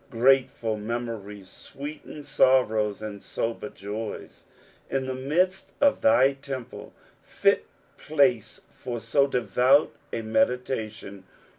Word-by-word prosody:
Grateful 120 -2 +2
memories 105 -3 -5
sweeten 145 +7 -9
sorrows 110 -7 +2
and 105 -2 -6
sober 115 -2 -4
jaji. 105 +2 -7 0.5
"Inthft 130 -1 -2
mid»t 180 +5 +2 0.2
of 285 0 +3
thy 280 - +5
temple." 135 -3 -8 0.3
Fit - - +1 0.3
place 135 -7 +1
for 120 -2 -6
so 140 +5 +2
devout 125 +3 +3 0.2
a 115 - -3
meditation. 110 - -1
125 Hz, 100 wpm, -26 LUFS, 110-135 Hz, 0.5 s, thy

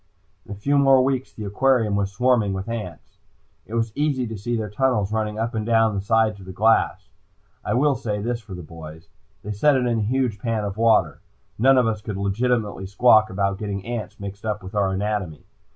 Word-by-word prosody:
In - - -11
a - - -4
few 140 +8 +1
more 135 -2 +5
weeks 130 -1 -1
the 110 - -8
aquarium 110 0 +2
was 100 -1 -1
swarming 115 -2 +2
with 95 +2 -5
ants. 105 -8 -7 0.5
It 115 - -6
was 115 -1 0
easy 145 -3 0
to 110 -1 -6
see 120 +4 -3
their 110 -1 -3
tunnels 105 -4 +1
running 110 -1 -2
up 115 +1 -2
and 110 -1 -2
down 115 -1 +3
the 100 - -2
sides 110 0 +1
of 95 - -13
the - - -6
glass. 110 +4 +1 0.5
I - - -1
will 145 +3 +3
say 110 -5 -3
this 120 +3 -3
for 105 -4 -9
the 90 - -8
boys. 80 0 -11 0.3
They 105 - -5
set 140 +8 +3
it 130 -1 +1
in 120 -2 +1
a - - -1
huge 120 -1 0
pan 115 -1 -2
of 100 -1 -4
water. 110 - +2 0.4
None 135 +3 +5
of 125 - +4
us 110 -2 -1
could 105 -2 -5
legitimately 105 0 -1
squawk 110 +1 +4
about 100 0 -1
getting 100 -2 -4
ants 115 -4 -5
mixed 100 0 -8
up 105 -2 -3
with 95 +2 -9
our 100 -2 +1
anatomy. 95 -4 -3
110 Hz, 215 wpm, -23 LUFS, 100-120 Hz, 0.5 s, more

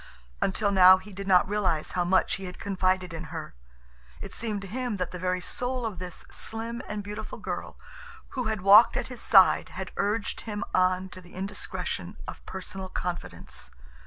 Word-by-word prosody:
Until 200 +1 +1
now 185 -1 +9
he 195 +2 -12
did 195 +1 -6
not 185 -2 +5
realize 185 -6 0
how 180 - +1
much 185 +1 +2
he 195 - -7
had 180 -1 -7
confided 185 -2 0
in 165 - -5
her. - - -7 0.7
It - - -8
seemed 215 -3 -3
to 195 - -7
him 245 +1 -2
that 180 -2 -2
the 180 - -6
very 180 0 0
soul 250 +5 -2
of 205 -6 -4
this 180 -1 -6
slim 230 +2 -4
and 210 -1 -4
beautiful 210 +1 -6
girl - - -5 0.5
who 250 -2 -3
had 220 -3 -1
walked 205 +4 +8
at - - -3
his 245 - -5
side 190 -3 +6
had 190 0 -6
urged 210 +2 -1
him 210 -1 -4
on 185 0 +2
to 185 - -10
the 175 0 -16
indiscretion 195 +2 -4
of - - -8
personal 190 0 -5
confidence. 175 - -5
190 Hz, 185 wpm, -28 LUFS, 185-210 Hz, 0.7 s, now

